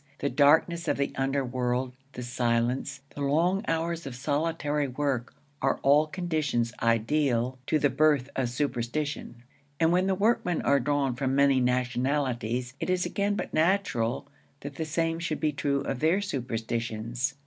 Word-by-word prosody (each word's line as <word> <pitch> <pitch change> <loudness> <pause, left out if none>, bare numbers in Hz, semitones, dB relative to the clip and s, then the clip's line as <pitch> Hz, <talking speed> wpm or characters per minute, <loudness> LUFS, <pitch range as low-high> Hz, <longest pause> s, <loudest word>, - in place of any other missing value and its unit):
The 140 - -2
darkness 160 +4 +4
of - - +1
the 140 0 -1
underworld, 130 -2 -1 0.2
the 125 - -6
silence, 120 +2 -1
the 145 - -7
long 170 +8 +2
hours 165 0 -1
of 130 - -6
solitary 145 +2 -1
work, 130 -2 -2 0.3
are - - +2
all 145 +3 +5
conditions 155 -9 -1
ideal 120 +2 +1
to 155 - +3
the 145 -2 +2
birth 145 -2 +3
of 130 -3 0
superstition; 125 -1 -3 0.4
and 165 0 +4
when 180 +2 +2
the 190 - +2
workmen 200 -4 +1
are 140 0 +4
drawn 140 0 0
from 135 +1 -1
many 140 -1 +4
nationalities, 125 -1 0
it - - -3
is 185 -1 +1
again 200 +3 0
but - - -4
natural 155 - +1 0.4
that 140 0 -6
the 160 +3 -4
same 165 +1 -1
should 165 -2 -2
be 155 -1 +1
true 140 -1 0
of 135 - -3
their 160 +7 +3
superstitions. 120 - -3
140 Hz, 155 wpm, -28 LUFS, 125-160 Hz, 0.4 s, all